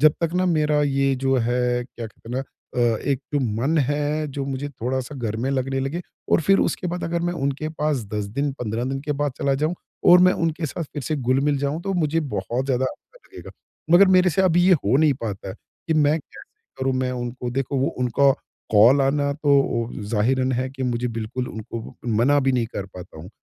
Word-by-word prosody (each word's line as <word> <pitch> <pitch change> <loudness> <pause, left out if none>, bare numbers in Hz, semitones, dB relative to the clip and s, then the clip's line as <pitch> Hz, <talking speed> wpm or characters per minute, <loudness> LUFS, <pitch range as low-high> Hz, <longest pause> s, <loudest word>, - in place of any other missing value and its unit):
जब 150 0 +6
तक 165 -1 0
ना 185 +1 +2
मेरा 150 -3 +2
ये 135 -1 +1
जो 135 0 +1
है 125 +1 0
क्या 120 -2 -8
कहते 110 - -16
हैं 125 - -2
ना - - 0 0.6
अ, - - -7
एक 140 -2 -1
तो 145 - +2
मन 125 +6 0
है 145 +2 0
जो 140 0 -4
मुझे 140 +1 -3
थोड़ा-सा 130 +1 -4
घर 110 -4 -3
में 130 +4 -1
लगने 135 0 -1
लगे 140 +6 -2 0.3
और - - +5
फ़िर 195 +6 +4
उसके 180 - -1
बाद 175 0 -3
अगर 170 +1 -1
मैं 175 0 0
उनके 140 -1 -2
पास 150 -6 -1
10 105 -1 -1
दिन, 140 +8 -2
15 120 -3 -3
दिन 135 +1 -2
के 145 +1 -2
बाद 145 -1 -1
चला 140 -1 +1
जाऊँ 155 +5 0 0.4
और 180 - +9
मैं 185 0 +6
उनके 165 -1 -1
साथ 165 - -4
फ़िर 145 -1 -7
से 155 +5 -2
घुल-मिल 135 +2 +1
जाऊँ 145 +4 -2
तो 195 +1 -2
मुझे 165 -2 +1
बहुत 125 -3 -3
ज़्यादा 130 -1 +1
अच्छा 470 - -7
लगेगा। - - -11 0.4
मगर 180 +4 +8
मेरे 180 -1 +4
से 190 +5 +1
अभी 175 -1 +4
ये 190 - +6
हो 105 +6 +3
नहीं 150 0 +4
पाता 100 -3 -4
है - - -6 0.3
कि 160 - +1
मैं 155 +1 +3
कैसे - - -15 0.3
करूँ 130 0 0
मैं 130 0 0
उनको 120 0 -4
देखो 135 +2 -1
वो 135 - +1
उनका 125 +3 +3 0.4
कॉल 115 +7 +6
आना 140 +1 +1
तो 140 -5 +2 0.2
अ, - - -6
ज़ाहिरन 130 +4 +1
है 130 +1 -1
कि 135 0 -7
मुझे 125 -1 -1
बिल्कुल 115 +2 -4
उनको 110 +1 -7 0.2
मना 145 +5 +4
भी 135 -1 +2
नहीं 120 -2 +1
कर 100 - -3
पाता 90 -3 -10
हूँ। 85 - -9
135 Hz, 225 wpm, -23 LUFS, 125-150 Hz, 0.6 s, और